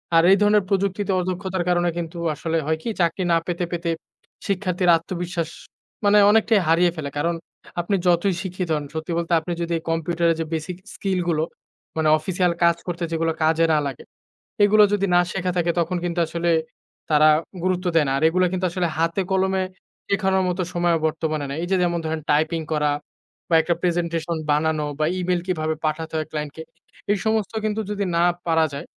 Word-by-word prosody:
আর 165 - +6
এই 195 - +6
ধরনের 210 -1 +4
প্রযুক্তিতে 195 0 0
অদক্ষতার 185 0 -2
কারণে 175 0 +2
কিন্তু 170 0 -5 0.2
আসলে 165 +2 -2
হয় 160 +1 0
কি - - -2
চাকরি 175 +2 +1
না 165 - +5
পেতে, 175 0 -1
পেতে, 170 -1 -1 0.6
শিক্ষার্থীর 185 -2 0
আত্মবিশ্বাস 170 -1 -4 0.6
মানে 205 +1 +5
অনেকটাই 220 -1 +4
হারিয়ে 170 +2 +4
ফেলে। 145 -2 -4
কারণ, 170 +3 0 0.5
আপনি 185 +4 0
যতই 175 +2 +3
শিক্ষিত 185 -2 -4
হন 150 -1 -3
সত্যি 160 +2 -4
বলতে 170 0 -1
আপনি 175 - -6
যদি 170 0 -1
কম্পিউটারের 165 0 +1
যে - - -2
বেসিক 160 +3 -3 0.2
স্কিল 190 -2 -1
গুলো, 155 -2 +1 0.5
মানে 160 -1 +2
অফিসিয়াল 180 +2 0
কাজ 170 0 +5
করতে 175 0 -3
যেগুলো 165 0 0
কাজে 165 +1 +3
না 150 - +4
লাগে। 135 - -7 0.6
এইগুলো 210 +1 +6
যদি 200 -1 +2
না - - +6
শেখা 185 -1 -1
থাকে 175 -1 +2
তখন 175 +2 0
কিন্তু 175 0 -2
আসলে 170 +1 0 0.6
তারা 155 +1 +6 0.3
গুরুত্ব 185 0 0
দেয় 160 -2 +4
না। 135 - 0
আর 140 - -2
এগুলা 185 +2 +2
কিন্তু 185 0 -1
আসলে 175 0 0
হাতে-কলমে, 190 +3 +1 0.4
শেখানোর 190 -1 +1
মত 180 - -3
সময়ও 175 -1 +2
বর্তমানে 155 -2 -2
নাই। 140 - -4
এই - - -3
যে 190 - +4
যেমন 170 -1 0
ধরেন 160 0 -2
টাইপিং 160 +2 +1
করা 150 -1 +1 0.6
বা 165 - +4
একটা 170 +1 0
প্রেজেন্টেশন 170 -2 -1
বানানো 150 0 +1
বা 155 - +2
ইমেইল 180 -1 0
কিভাবে 160 -3 -1
পাঠাতে 160 +1 -2
হয় 155 - -2
ক্লায়েন্টকে। 150 +1 -5 0.5
এই 205 - +2
সমস্ত 220 -1 0
কিন্তু 215 0 -1
যদি 205 -1 -1
না 170 - +4 0.2
পারা 160 -1 +3
যায় 140 +4 -6
170 Hz, 180 wpm, -23 LUFS, 160-185 Hz, 0.6 s, আর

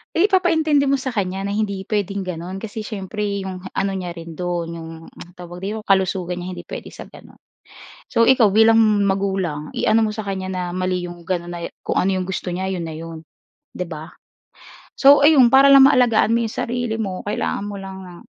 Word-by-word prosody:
Ipapaintindi 330 -6 +3
mo 275 - +2
sa 265 -1 -1
kanya 195 -5 -2
na 200 - -3
hindi 200 -3 -2
puwedeng 200 -2 -1
gano'n. 185 +1 -6
Kasi 220 0 -6
siyempre 205 0 -4
'yong 185 -1 -7
ano 195 0 -1
niya 180 -2 -5
rin 165 -2 -10
do'n, 175 -2 -3
'yong, 165 0 -8 0.4
tawag 175 -1 -10
dito, 205 +4 -4
kalusugan 190 -3 0
niya 180 +1 -5
hindi 175 - -7
puwede - - -9
sa - - -10
gano'n. - - -15 0.8
So 230 -2 +4
ikaw 235 -6 +5
bilang 225 +2 +5 0.3
magulang 190 -6 -2
i-ano 225 +1 +2
mo 215 - -1
sa 215 - -5
kanya 190 -2 -4
na 185 -1 -3
mali 185 0 -1
'yong 175 0 -11
gano'n 175 0 -3
na 175 -1 -6
e, - - -6
kung - - -3
ano 195 - +2
'yong 185 -1 -2
gusto 185 -1 -4
niya 190 +2 -3
'yon 185 -3 -3
na 160 - -6
'yon, 160 0 -8 0.5
'di 180 - -2
ba? 160 -2 -8 0.9
So 280 +1 +6
ayun 280 -6 +6
para 275 +2 +7
lang 270 0 +9
maalagaan 230 -4 +3
mo 235 - 0
yung 225 - -5
sarili 245 -2 -2
mo 190 -3 -5
kailangan 205 0 -2
mo 205 -1 -6
lang 190 0 -8
ng 175 -1 -12
195 Hz, 200 wpm, -21 LUFS, 180-225 Hz, 0.9 s, lang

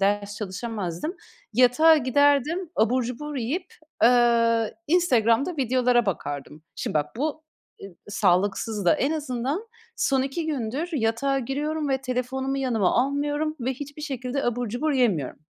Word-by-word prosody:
ders 205 +1 0
çalışamazdım, 210 - -4 0.4
yatağa 280 +6 +6
giderdim. 290 +5 +2
Abur 250 +4 +2
cubur 280 +5 -5
yiyip, 295 +10 -3 0.3
ııı, 230 -2 +4
Instagram'da 285 -2 +2
videolara 250 -2 +2
bakardım. 145 -4 -4
Şimdi - - -4
bak, 150 +7 -1
bu 305 +3 -2 0.4
e - - -9
i 190 - -14
sağlıksız 200 +2 +1
da. 170 - +5
En 275 - 0
azından 290 - -3 0.3
son 265 -2 +2
2 275 +5 -3
gündür 285 +2 -2
yatağa 270 +2 0
giriyorum 295 +4 -2
ve 265 -1 0
telefonumu 265 +1 -2
yanıma 235 -8 +1
almıyorum 290 +3 -1
ve 250 +2 -1
hiçbir 290 +3 -8
şekilde 270 -1 -3
abur 240 0 -1
cubur 270 +8 -1
yemiyorum. 185 - 0
255 Hz, 135 wpm, -25 LUFS, 225-290 Hz, 0.4 s, yatağa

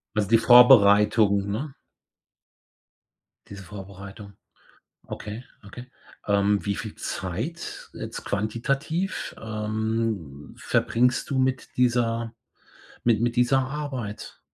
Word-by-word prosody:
Also, 105 -2 +1
die 115 - +6
Vorbereitung, 105 -4 +6
ne? 135 +7 -4 1.8
Diese 100 -1 -9
Vorbereitung. 100 +2 -10 0.7
Okay, 105 +3 -7 0.2
okay. 120 +5 -11 0.4
Ähm, 100 0 +2
wie 100 -1 -1
viel 110 -2 -7
Zeit 110 - -5
jetzt - - -7
quantitativ, 135 - -2
ähm, 110 -8 -3
verbringst 125 +2 +1
du 135 - 0
mit 130 -1 0
dieser 115 -2 +1 0.7
mit 115 -3 +3
mit 120 0 0
dieser 125 +2 +3
Arbeit? 130 -6 -6
110 Hz, 95 wpm, -25 LUFS, 100-125 Hz, 1.8 s, die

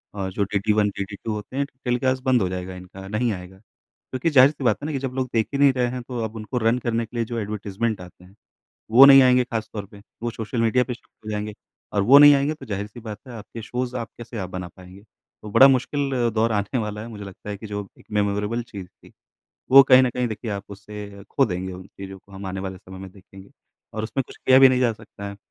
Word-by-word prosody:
और 95 -2 -3
जो 100 - 0
DD 100 +1 0
1 105 -1 +3
DD 100 +1 -4
2 110 - 0
होते 105 +4 -7
हैं 140 - +1 0.2
टेलीकास्ट 130 +1 0
बंद 130 -3 +3
हो 95 - 0
जाएगा 90 0 -5
इनका 90 +1 -11
नहीं 110 +3 0
आएगा। 90 +1 -9
क्योंकि 130 - -6
ज़ाहिर 135 -2 +7
सी 150 - -9
बात 110 -4 +3
है - - -5
ना 155 - -3
कि 135 - -2
जब 130 -1 -4
लोग 130 -1 -2
देख 110 -1 +1
ही 140 - -1
नहीं 140 -2 +6
रहे 125 -1 +1
हैं 125 0 -4
तो 125 -2 -4
अब 110 +1 -5
उनको 110 +3 -5
रन 115 +1 +2
करने 115 -1 -1
के 115 +2 -10
लिए 115 - 0
जो 120 +1 -5
एडवर्टाइजमेंट 105 0 -3
आते 90 0 -14
हैं, 95 +3 -19 0.6
वो 130 +4 +10
नहीं 135 -1 +9
आएँगे 125 0 +5
खास 115 -3 -4
तौर 100 -2 -5
पे। 100 0 -15 0.2
वो 120 - 0
सोशल 115 +1 -3
मीडिया 125 +2 +3
पर 125 - -4
शुरू 115 -2 -17
हो 110 - -3
जाएँगे 105 0 -3 0.4
और 100 - +2
वो 130 +7 +8
नहीं 145 0 +10
आएंगे 140 +2 +1
तो 150 -3 -12
ज़ाहिर 105 -2 -4
सी 115 +3 -12
बात 110 -2 -8
है 125 - -9
आपके 110 +1 -9
शोज़ 125 +2 -4
आप 115 -3 -5
कैसे 120 -1 -8
आप 95 -2 -4
बना 90 -1 -5
पाएँगे। 95 +1 -14 0.4
तो 105 - -8
बड़ा 135 - +8
मुश्किल 135 +1 +1 0.2
दौर 115 +1 +2
आने 105 +3 -1
वाला 105 -1 -4
है 115 - -7
मुझे 105 -3 -8
लगता 100 +1 -10
है 100 - -4
कि 110 - -9
जो 105 -1 -5
एक - - -19
मेमोरेबल 105 +3 0
चीज़ 100 -6 -9
थी - - -21 0.6
वो 135 +1 +10
कहीं 130 0 +8
ना 125 - +2
कहीं 125 0 -1
देखिए 110 +1 -5
आप 100 -1 -4
उसे 100 0 -9
खो 135 - +3
देंगे 95 -1 -4
उन 90 +1 -10
चीजों 95 0 -10
को 100 +1 -22
हम 95 0 -8
आने 95 0 -4
वाले 95 -1 -5
समय 95 +1 -12
में 95 -1 -9
देखेंगे 95 0 -16 0.4
और 110 - -3
उसमें 125 +5 -2
कुछ - - -13
किया 130 0 +5
भी 135 - +9
नहीं 130 -1 +1
जा 120 -2 +3
सकता 105 -2 -10
है। 100 - -9
110 Hz, 265 wpm, -23 LUFS, 100-125 Hz, 0.6 s, वो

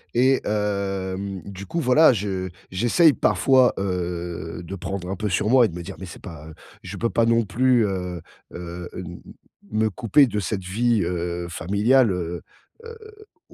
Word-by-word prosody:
Et 130 +2 +4
hem, 100 -2 -2
du 100 0 -9
coup, 170 - -2
voilà, 150 +1 +5
je 95 -4 -2 0.2
j'essaye 120 - +4
parfois, 130 -2 +3
heu, 85 -3 -4
de 85 +3 -7
prendre 90 0 -5
un 95 - -2
peu 105 +3 -3
sur 90 +3 0
moi 125 0 +6
et - - +2
de 85 - -9
me 90 - -6
dire: - - -8
«Mais 95 - -7
c'est 90 - -11
pas 80 -5 -10 0.3
je - - -8
peux 115 - 0
pas 115 - +2
non 115 -1 +3
plus, 125 +1 +3
heu 90 -3 -3 0.3
heu, 85 0 -7
hem, 90 -1 -8 0.5
me 110 +1 +1
couper 115 +7 +4
de 105 -4 -2
cette 95 0 -3
vie, 110 +3 +1
heu, 85 0 -3
familiale, 105 +9 +2
heu 85 -1 -4 0.4
heu, 460 0 -9 0.5
au - - -18
100 Hz, 175 wpm, -23 LUFS, 90-115 Hz, 0.5 s, moi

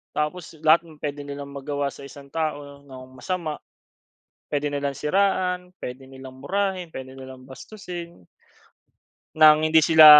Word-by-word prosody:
tapos 155 +2 -2
lahat 155 +1 +7
m 160 - -13
pwede 145 -1 -3
nilang 140 0 -6
magawa 140 +1 -2
sa 140 - -10
isang 140 0 -12
tao 145 -3 -3
nang 130 -1 -11
masama. 165 0 -3 0.9
Pwede 145 0 0
nilang 140 -1 -1
siraan, 180 +1 +1
pwede 130 +1 -7
nilang 130 -1 -11
murahin, 190 -3 -1
pwede 130 -3 -8
nilang 130 -1 -10
bastusin 170 - -9 1.1
nang 155 0 +8
hindi 160 0 +6
sila, 160 -1 +9
150 Hz, 135 wpm, -25 LUFS, 140-170 Hz, 1.1 s, sila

